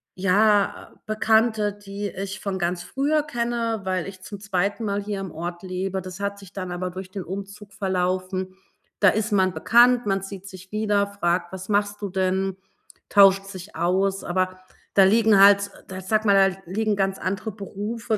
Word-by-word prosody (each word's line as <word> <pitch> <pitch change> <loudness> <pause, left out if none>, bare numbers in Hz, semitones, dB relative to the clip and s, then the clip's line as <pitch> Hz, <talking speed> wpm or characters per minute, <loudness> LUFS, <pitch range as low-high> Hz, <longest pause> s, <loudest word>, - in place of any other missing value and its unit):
ja, 200 +2 +2
Bekannte, 215 -1 +2
die 205 0 -6
ich 195 +1 -6
von 195 -2 -3
ganz 175 0 -1
früher 290 +7 0
kenne, 235 -5 -2
weil 185 -2 -2
ich 190 -1 -10
zum 200 +2 -8
2. 200 +2 -1
Mal 200 0 -1
hier 205 -1 -4
im 195 -2 -6
Ort 175 +2 -6
lebe. 190 +1 -3
Das 185 +1 -9
hat 200 0 -3
sich 195 -1 -14
dann 185 -2 -5
aber 180 +1 -3
durch 185 +1 -8
den 195 -2 -5
Umzug 200 +2 -8
verlaufen. 185 0 -2 0.5
Da 200 - +7
ist 215 +2 -1
man 190 -2 +3
bekannt, 240 +2 +4
man 195 -1 0
sieht 195 0 -8
sich 185 -1 -12
wieder, 210 -1 +1
fragt: 175 -3 -1
„Was 190 0 -7
machst 205 0 0
du 200 - -3
denn?", 190 0 0 0.5
tauscht 195 -1 +6
sich 195 0 -10
aus. 190 +4 0
Aber 185 +1 -1 0.4
da 195 - +7
liegen 215 +1 +5
halt 200 0 +6 0.2
da 185 - -6
ich 185 - -8
sage 215 +2 +1
mal, 195 -1 +5
da - - -14
liegen 210 +4 0
ganz 195 -1 -1
andere 190 +3 -3
Berufe, 215 +3 -4
195 Hz, 180 wpm, -24 LUFS, 185-210 Hz, 0.5 s, Da